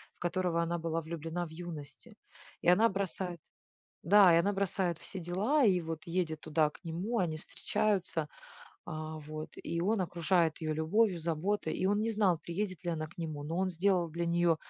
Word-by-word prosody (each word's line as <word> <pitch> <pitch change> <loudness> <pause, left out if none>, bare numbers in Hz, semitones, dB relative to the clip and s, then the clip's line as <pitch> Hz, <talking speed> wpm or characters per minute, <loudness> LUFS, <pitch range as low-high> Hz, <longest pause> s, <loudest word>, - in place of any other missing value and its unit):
в - - -34
которого 175 -1 0
она 170 +1 -1
была 165 0 -1
влюблена 165 +2 -4
в 165 - -10
юности. 170 +6 -9 0.5
И - - -3
она 205 +6 +6
бросает 190 -3 -3 0.6
да, 195 0 +7
и 165 - +6
она 200 +4 +2
бросает 190 -3 0
все 190 - -6
дела, 205 - +2
и 185 -4 +4
вот 160 -1 -5
едет 165 -3 -1
туда 155 0 +2
к - - -16
нему. 190 +9 -2
Они 165 -4 0
встречаются, 190 -4 -1 0.6
а, 155 0 -5
вот. 155 +1 -7
И 170 0 -2
он 210 +3 +2
окружает 170 -2 +1
ее 155 - 0
любовью, 175 +5 +2
заботой, 170 +5 -1
и - - -2
он 205 +2 +2
не 225 +1 0
знал, 195 -6 +3
приедет 185 +1 -4
ли 175 - -1
она 155 -2 -3
к 165 - -20
нему, 155 -3 -4
но 165 +4 -3
он 190 0 +2
сделал 180 0 +2
для 170 +2 -3
нее, 170 -1 +3
170 Hz, 190 wpm, -32 LUFS, 160-190 Hz, 0.6 s, да